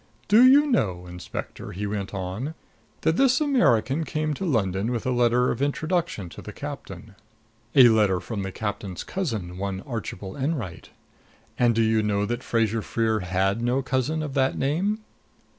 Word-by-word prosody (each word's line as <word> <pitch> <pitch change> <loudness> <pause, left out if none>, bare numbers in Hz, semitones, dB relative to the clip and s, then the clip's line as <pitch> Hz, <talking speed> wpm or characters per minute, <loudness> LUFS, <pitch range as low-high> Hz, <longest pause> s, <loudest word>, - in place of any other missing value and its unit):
"Do 215 +4 +7
you 275 +3 +7
know, 95 - 0
Inspector," 90 0 -7
he 100 +4 -4
went 100 -1 -3
on, 100 - -4 0.5
"that 160 - +2
this 260 -1 +4
American 165 - +2
came 155 -1 -2
to 190 - -4
London 105 - 0
with 120 -2 -3
a 130 - +1
letter 120 0 +3
of 120 - -4
introduction 155 - -1
to - - -10
the 105 - -8
captain 110 -8 -8 0.6
a 130 -3 +9
letter 105 -5 +3
from 100 +3 -5
the 95 0 -4
captain's 100 -3 -4
cousin, 110 - -4
one 95 -1 -3
Archibald 100 -5 -6
Enwright? 135 - -3 0.7
And 120 -2 +3
do 115 - +3
you 110 0 +3
know 105 -1 0
that 120 +3 -3
Fraser 115 -2 0
Freer 110 0 0
had 95 +3 0
no 125 +3 +1
cousin 135 +4 -1
of 145 -3 -5
that 135 -1 +1
name?" 190 +10 0
115 Hz, 165 wpm, -25 LUFS, 100-145 Hz, 0.7 s, a